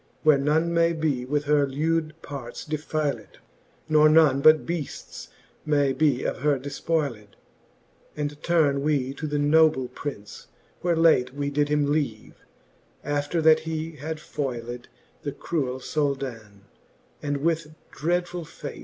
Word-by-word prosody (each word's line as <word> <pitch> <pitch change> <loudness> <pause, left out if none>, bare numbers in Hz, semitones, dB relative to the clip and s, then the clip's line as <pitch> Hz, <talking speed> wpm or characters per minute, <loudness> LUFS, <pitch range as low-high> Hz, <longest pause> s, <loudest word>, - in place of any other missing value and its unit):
Where 155 -3 +5
none 160 +4 +1
may 170 0 +3
be 150 -6 -1
with 145 +2 0
her 145 -1 +3
lewd 155 +3 -1
parts 140 -4 -7
defyled, 155 -1 -3 0.5
Nor 155 -1 +5
none 155 -4 +5
but 155 +1 +6
beafts 165 -4 -5 0.4
may 145 -3 +2
be 145 -4 +2
of - - -2
her 145 +1 +2
defpoyled: 140 -5 -3 0.8
And 145 0 -4
turne 150 -5 +2
we 140 -3 0
to 155 +3 -5
the 145 0 -1
noble 145 -3 +3
Prince, 105 -8 -8 0.3
where 175 -1 +1
late 150 -6 +3
We 145 0 -2
did 145 0 +1
him 145 -1 +1
leave, 140 -8 -2 0.7
after 145 +3 -1
that 160 0 +6
he 160 0 -4
had 155 +3 -5
foyled 120 -5 -5 0.3
The 145 - -4
cruell 130 -6 -2
Souldan, 130 -8 -3 0.6
and 145 -1 -1
with 155 +1 -1 0.2
dreadful! 175 +3 -1
fate. - - -9
150 Hz, 135 wpm, -25 LUFS, 140-160 Hz, 0.8 s, but